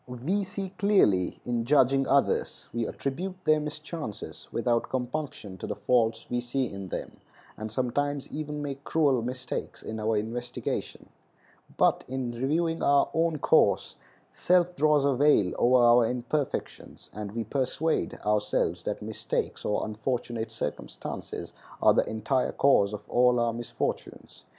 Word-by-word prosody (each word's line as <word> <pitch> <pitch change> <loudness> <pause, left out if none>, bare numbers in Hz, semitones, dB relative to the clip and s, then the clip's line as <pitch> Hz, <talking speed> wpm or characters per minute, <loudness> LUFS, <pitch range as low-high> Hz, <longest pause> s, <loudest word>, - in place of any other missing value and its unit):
We 140 +12 -1
see 195 0 -4
clearly 105 - +3
in 120 -1 0
judging 135 +1 +3
others. 140 0 +1
We 115 -1 -1
attribute 180 +8 -4
their 155 0 +4
mischances 150 -5 -6
without 120 0 0
compunction 125 -7 -4
to - - -5
the - - -3
faults 115 +1 +1
we 120 0 -1
see 130 +2 -1
in 100 -4 -6
them, - - -6 0.4
and 110 0 -6
sometimes 140 +4 -1
even 150 -1 -4
make 140 -1 -5
cruel 145 -7 +2
mistakes 125 +2 -5
in 110 0 -5
our 110 0 +1
investigation; 120 +3 -4 0.7
but - - +3
in 130 -2 -3
reviewing 160 +7 0
our 140 0 +4
own 165 -1 +1
course - - +3 0.4
self 180 0 +2
draws 150 -1 +3
a 140 - +3
veil 130 -8 +4
over 125 0 +5
our 120 -1 +6
imperfections, 125 +4 -3
and 105 -1 -6
we 115 0 -2
persuade 140 +7 -1
ourselves 105 0 +1
that - - -3
mistakes - - -3
or 105 - 0
unfortunate 115 +1 -3
circumstances - - -6 0.3
are - - +6
the - - +2
entire 110 +4 0
cause 105 -8 +4
of 105 -1 -7
all 125 0 +4
our 120 -1 +1
misfortunes. 120 +1 -5
125 Hz, 140 wpm, -28 LUFS, 115-150 Hz, 0.7 s, our